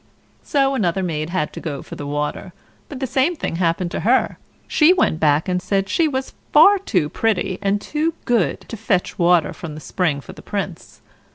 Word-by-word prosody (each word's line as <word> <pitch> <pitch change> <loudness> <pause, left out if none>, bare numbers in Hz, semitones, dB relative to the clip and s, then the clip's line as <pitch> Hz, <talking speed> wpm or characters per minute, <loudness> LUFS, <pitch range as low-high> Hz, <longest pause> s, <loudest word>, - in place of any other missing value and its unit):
So 275 -1 +1
another 190 -6 0
maid 155 -3 -2
had 170 -4 -2
to - - -7
go 145 -4 -5
for - - -11
the 145 - -6
water, 150 +5 -3 0.4
but 280 - -7
the 265 - -1
same 270 +7 +1
thing 165 - -3
happened 170 0 0
to - - -3
her; 245 +4 +1 0.3
she 325 +3 +5
went 330 - +1
back 150 +1 +2
and 180 -1 0
said 195 +1 0
she 330 - +2
was 265 -2 -3 0.2
far 390 +7 +7
too 180 - 0
pretty 190 +1 -1
and 200 0 +1
too 310 +8 -2
good 235 -7 +1
to 230 - -9
fetch 195 -4 -1
water 175 -2 +3
from 155 -4 -8
the - - -7
spring 155 -3 -1
for - - -11
the - - -13
Prince. - - -6
190 Hz, 200 wpm, -20 LUFS, 165-265 Hz, 0.4 s, far